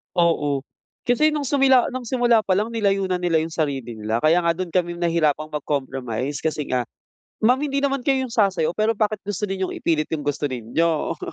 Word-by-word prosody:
Oo, 150 -5 +2 0.5
kasi 305 +6 +4
nung 300 - -1
sumila 265 -2 +3
nung 255 -2 -6
simula 240 -2 +2
pa 190 - +2
lang 210 +4 0
nilayo 200 -4 0
na 180 - +1
nila 175 -3 +1
yung 160 - -3
sarili 135 -8 -3
nila. 110 +2 -2
Kaya 170 +3 +3
nga 170 - +3
do'n 180 +1 -4
kami 175 0 0
nahirapang 165 -3 0
mag-compromise 135 -3 -3
kasi 155 -2 -3
nga, 125 -1 0 0.6
"Ma'am 245 +4 +4
hindi 280 -1 -1
naman 275 -1 +1
kayo 270 -2 +2
'yong 260 - -5
sasayaw 195 -8 +2
pero 215 +5 0
bakit 215 0 0
gusto 205 0 -4
ninyong 190 -2 -2
ipilit 155 -2 0
yung 150 - -4
gusto 145 0 -1
ninyo," 145 +6 -1
175 Hz, 190 wpm, -22 LUFS, 150-225 Hz, 0.6 s, kasi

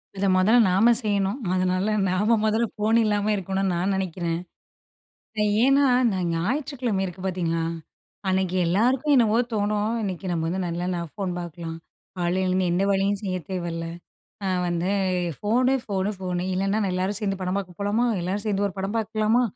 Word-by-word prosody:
இத 195 +1 -1
மொதல்ல 210 +6 +5
நாம 220 +6 +5
செய்யணும். 200 +3 0
அதனால 185 +3 +1 0.2
நாம 210 +5 +2
மொதல்ல 220 +2 +2
ஃபோன் 215 +2 +2
இல்லாம 210 0 +1
இருக்கணூனு 195 0 -1
நா 170 - -1 0.2
நெனைக்கிறேன். 170 -3 -2 1.3
ஏன்னா, 275 +1 +4 0.3
நா 190 - -1 0.2
ஞாயிற்றுக்கிழமை 245 - -1
இருக்கு 185 +1 -8
பாத்தீங்களா, 170 -3 -1 0.7
அன்னைக்கு 185 -1 0
எல்லாருக்கும் 250 - +2
என்னவோ 230 -2 +4
தோணும் 210 +1 0
இன்னைக்கு 190 -2 -4
நம்ம 165 -2 -1
வந்து 185 +3 -2
நல்லா 175 +1 -2
ஃபோன் 195 -3 -3
பாக்கலாம். 170 -1 -6 0.4
காலையிலருந்து 185 +1 +1
எந்த 180 +3 +1
வேலையும் 195 +1 +1
செய்ய 185 -2 -1
தேவையில்ல. 170 -3 -3 0.6
நான் 185 -2 0
வந்து 175 +2 -1 0.5
ஃபோனு, 250 +5 +2
ஃபோனு, 195 -2 -1
ஃபோனு 180 -1 -2
இல்லன்னா, 195 +3 0
நெல்லாரும் 185 +2 -1
சேந்து 195 -2 -2
படம் 185 +1 -1
பாக்க 185 -3 -6
போலாமா, 205 +4 +1 0.2
எல்லாரு 190 +4 -2
சேர்ந்து 205 -1 +1
ஒரு 190 - -10
படம் 195 +3 -2
பாக்லாமா 220 +2 +1
195 Hz, 145 wpm, -24 LUFS, 180-215 Hz, 1.3 s, மொதல்ல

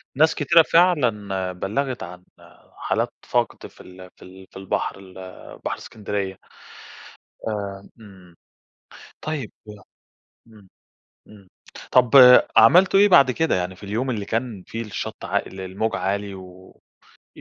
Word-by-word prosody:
ناس 160 +3 +3
كتيرة 165 +3 +4
فعلًا 105 - +1
بلغت 120 +8 -4
عن 90 +1 -11 0.5
حالات - - -2
فقد - - -2
في - - -18
ال 90 0 -14
في - - -28
ال 95 +1 -15
في - - -12
البحر 95 0 -3
ال 95 -1 -15 0.5
بحر - - -3
إسكندرية. 100 -3 -6 1.1
آآ، 100 -2 -6
إمم، 95 -5 -16 0.9
طيب 150 -7 -5 1.0
إمم، 105 -4 -19 0.6
إمم، 100 -3 -17 0.4
طب 125 -2 +4 0.5
عملتوا 180 +12 +6
إيه 205 - +6
بعد 140 -8 +6
كده؟ 160 +5 0
يعني 90 +1 -3
في - - -20
اليوم 110 +6 -3
اللي 105 -5 -3
كان 115 -2 -4
فيه 115 - -6
الشط 105 -3 -7
عا - - 0
الموج 95 +4 -4
عالي، 100 +1 -3
و 95 0 -13 0.7
إ - - -12
105 Hz, 130 wpm, -22 LUFS, 95-125 Hz, 1.1 s, عملتوا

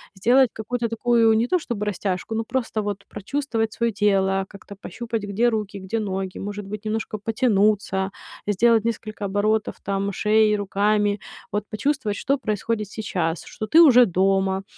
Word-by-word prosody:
Сделать 245 +6 +4
какую-то 235 +2 -3
такую, 230 0 +3
не 225 +2 +2
то 365 - +2
чтобы 225 -9 -4
растяжку, 200 +1 -2
но 225 - 0
просто 225 -2 -2
вот 205 -1 -4
прочувствовать 225 0 -2
своё 235 0 0
тело, 195 -1 +2
как-то 200 0 -12
пощупать, 225 +2 -5
где 205 +4 +1
руки, 210 -3 -2
где 190 +4 -3
ноги. 190 -3 -3
Может 205 0 -5
быть, 210 +1 -6
немножко 220 0 -3
потянуться, 205 -3 +1 0.3
сделать 220 +2 +3
несколько 215 -2 -4
оборотов 210 +2 0
там 200 0 -2
шеи, 215 +2 +3
руками. 205 0 +1 0.3
Вот 210 0 -1
почувствовать, 235 -2 -1
что 275 +1 0
происходит 215 -2 -2
сейчас, 180 -6 -3
что 215 - -6
ты 320 +10 +7
уже 260 -7 +8
дома, 190 -1 +2
210 Hz, 155 wpm, -23 LUFS, 200-230 Hz, 0.3 s, уже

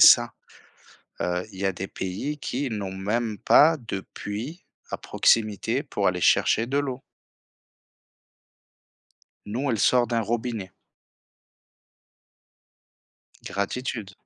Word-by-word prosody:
ça. - - +8 0.9
Heu, 90 0 -1
il 95 - -11
y 100 - -1
a 95 - +1
des 95 +2 -5
pays 100 +11 -4
qui 140 -1 -3
n'ont 100 -4 -4
même 105 +3 -1
pas 160 +9 +6
de 115 -7 -5
puits 120 - -6 0.3
à - - -3
proximité 110 -4 +2
pour - - -1
aller - - 0
chercher 115 - +4
de 135 +4 -1
l'eau! 135 -3 -2 2.4
Nous, 125 +7 -2
elle 115 - 0
sort 125 +4 +4
d'un 115 0 0
robinet. 115 -3 -3 2.8
Gratitude. 100 +1 -3
115 Hz, 110 wpm, -25 LUFS, 100-125 Hz, 2.8 s, ça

